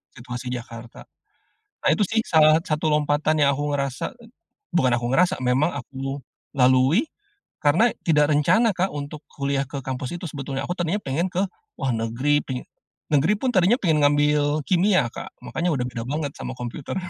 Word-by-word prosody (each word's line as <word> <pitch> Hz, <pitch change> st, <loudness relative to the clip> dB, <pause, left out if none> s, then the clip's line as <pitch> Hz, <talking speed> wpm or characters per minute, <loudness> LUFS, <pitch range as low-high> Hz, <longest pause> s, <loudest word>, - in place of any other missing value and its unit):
situasi 125 Hz, +1 st, -7 dB
Jakarta. 115 Hz, -1 st, -8 dB, 0.8 s
Nah -, -, +2 dB
itu 210 Hz, -, +3 dB
sih 225 Hz, +3 st, +1 dB
salah 155 Hz, 0 st, +5 dB
satu 155 Hz, -2 st, -2 dB
lompatan 150 Hz, +1 st, +1 dB
yang 140 Hz, -, +5 dB
aku 145 Hz, 0 st, -2 dB
ngerasa 140 Hz, -, -2 dB
et 230 Hz, -, -15 dB, 0.4 s
bukan 130 Hz, -8 st, +2 dB
aku 120 Hz, 0 st, 0 dB
ngerasa, 170 Hz, 0 st, +2 dB
memang 130 Hz, +6 st, +2 dB
aku 135 Hz, 0 st, -5 dB, 0.3 s
lalui 130 Hz, +3 st, +4 dB, 0.6 s
karena 175 Hz, +12 st, +4 dB, 0.2 s
tidak 150 Hz, -2 st, +3 dB
rencana 220 Hz, -, +4 dB
Kak, 185 Hz, +2 st, 0 dB
untuk 145 Hz, +1 st, -6 dB
kuliah 140 Hz, -1 st, -1 dB
ke 140 Hz, 0 st, -5 dB
kampus 130 Hz, +1 st, -4 dB
itu 175 Hz, -, -8 dB
sebetulnya, 135 Hz, -1 st, -4 dB
aku 175 Hz, -, -2 dB
tadinya 175 Hz, +5 st, -1 dB
pengen 150 Hz, +7 st, -1 dB
ke, 185 Hz, -, 0 dB, 0.4 s
wah 130 Hz, -, 0 dB
negeri, 120 Hz, +6 st, +1 dB
peng 130 Hz, -2 st, -4 dB, 0.5 s
negeri 155 Hz, +9 st, +4 dB
pun 260 Hz, -, +1 dB
tadinya 185 Hz, +5 st, +4 dB
pengen 155 Hz, -5 st, +3 dB
ngambil 145 Hz, +1 st, +2 dB
kimia 185 Hz, -, +3 dB
Kak, -, -, -7 dB, 0.2 s
makanya 175 Hz, +2 st, -1 dB
udah 125 Hz, -1 st, -1 dB
beda 115 Hz, -1 st, -5 dB
banget 145 Hz, +1 st, -2 dB
sama -, -, -5 dB
komputer. 125 Hz, +6 st, -6 dB
145 Hz, 170 wpm, -23 LUFS, 130-160 Hz, 0.8 s, salah